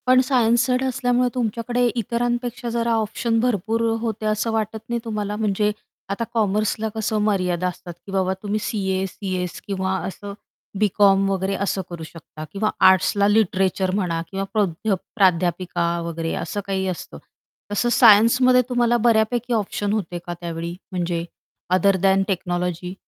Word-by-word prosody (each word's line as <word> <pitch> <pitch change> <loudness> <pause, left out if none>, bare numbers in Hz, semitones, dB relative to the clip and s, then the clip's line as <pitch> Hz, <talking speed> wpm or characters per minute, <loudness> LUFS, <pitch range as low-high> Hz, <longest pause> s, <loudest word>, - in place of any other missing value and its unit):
पण 255 0 +6
science 240 -3 +3
side 255 0 +1
असल्यामुळे 250 -1 +1
तुमच्याकडे 240 +1 -1
इतरांपेक्षा 240 +1 -2
जरा 235 0 0
ऑप्शन 225 +1 0
भरपूर 225 -1 0 0.2
होते, 220 -2 -3
असं 215 +2 0
वाटत 220 0 -1
नाही 235 0 -1
तुम्हाला? 210 -2 -3
म्हणजे 210 -1 +1 0.4
आता 200 +4 -2
कॉमर्सला 215 0 0
कसं 220 0 -1
मर्यादा 185 -4 0
असतात 175 0 -7
की 195 - -9
बाबा 190 -1 +1
तुम्ही 210 +1 -1
सी-ए, 190 -3 -1
सी-एस 185 -2 -4
किंवा 190 -1 -1
असं 200 +1 -7 0.5
बी-कॉम 195 -1 +4
वगैरे 195 0 -1
असं 195 - -1
करू 170 -2 -7
शकता 155 -1 -10
किंवा 215 +2 0 0.2
आर्ट्सला 195 +2 +3
लिटरेचर 190 -3 +2
म्हणा 175 -5 -1
किंवा 195 0 -2
प्रध 205 -1 -1 0.3
प्राध्यापिका 180 -3 +1 0.2
वगैरे 165 -1 -3
असं 205 - -4
काही 190 -1 -1
असतं. 180 -2 -5 0.5
तसं 225 +4 +1
सायन्समध्ये 240 +3 +6
तुम्हाला 240 -1 +2
बऱ्यापैकी 235 +1 +2
ऑप्शन 205 -1 -1
होते 180 -5 -3
का 175 - -4
त्यावेळी 170 0 -5 0.2
म्हणजे 175 -2 -2 0.5
अदर 195 +2 +4
दॅन 195 0 +4
टेक्नॉलॉजी? 180 -1 -2
205 Hz, 145 wpm, -22 LUFS, 185-230 Hz, 0.5 s, पण